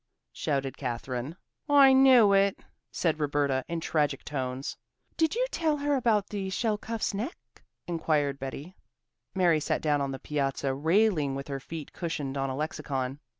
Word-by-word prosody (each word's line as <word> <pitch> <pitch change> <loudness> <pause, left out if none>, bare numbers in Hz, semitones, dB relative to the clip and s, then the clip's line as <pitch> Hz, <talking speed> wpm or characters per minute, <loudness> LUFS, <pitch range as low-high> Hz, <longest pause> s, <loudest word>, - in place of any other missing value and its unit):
shouted 135 -2 -2
Katherine. 125 +3 -4 0.3
"I 280 -2 +7
knew 260 -6 +7
it!" 195 0 +3 0.3
said 160 -3 0
Roberta 145 -3 +1
in 170 -1 -3
tragic 150 -3 0
tones. 130 -2 -4 0.4
"Did 320 +1 +1
you - - +2
tell 315 -3 +1
her 290 0 0
about 225 -6 +2
the 195 -2 -3
shelcuff's 220 +2 -1
neck?" 225 - -4 0.5
inquired 150 -5 0
Betty. 140 +7 -7 0.6
Mary 175 -4 +4
sat - - -1
down 145 -2 +2
on 140 - -1
the 135 - -4
piazza 135 -1 -1
railing 160 -1 +2
with 140 0 -5
her 135 -1 -3
feet 155 +2 -8
cushioned 150 -6 -4
on 135 -1 -1
a 130 - -3
lexicon. 135 -2 -3
155 Hz, 150 wpm, -28 LUFS, 135-205 Hz, 0.6 s, I